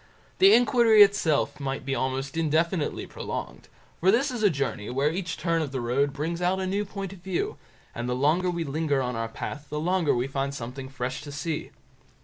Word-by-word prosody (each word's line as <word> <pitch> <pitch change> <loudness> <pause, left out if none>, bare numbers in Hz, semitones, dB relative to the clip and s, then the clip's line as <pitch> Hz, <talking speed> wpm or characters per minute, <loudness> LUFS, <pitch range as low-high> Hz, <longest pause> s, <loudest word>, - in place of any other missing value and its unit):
The 390 +1 +8
inquiry 235 -3 +6
itself 170 -9 +1
might 135 -1 -3
be 135 - -1
almost 135 +1 -2
indefinitely 165 +1 0
prolonged, - - -6 0.3
for 185 - +3
this 255 +7 +3
is 245 -3 -4
a 210 - +5
journey 140 - -2
where 140 +4 +1
each 170 -3 -3
turn 165 0 0
of 145 -4 -3
the 135 - -2
road 130 +4 +1
brings 160 +5 -3
out 180 +2 +1
a 190 - -1
new 200 +2 -1
point 195 -1 -6
of 195 - -13
view, 180 0 -2 0.4
and 120 +1 -4
the 125 - 0
longer 155 +8 +2
we 170 -1 -1
linger 145 -1 0
on 125 -2 -2
our 115 0 -2
path, 145 +5 -6
the 150 - -3
longer 175 -2 +1
we 120 +1 0
find 135 0 -2
something 130 +2 -6
fresh 130 0 -4
to 145 - -8
see. 150 +2 -3
155 Hz, 205 wpm, -26 LUFS, 135-185 Hz, 0.4 s, The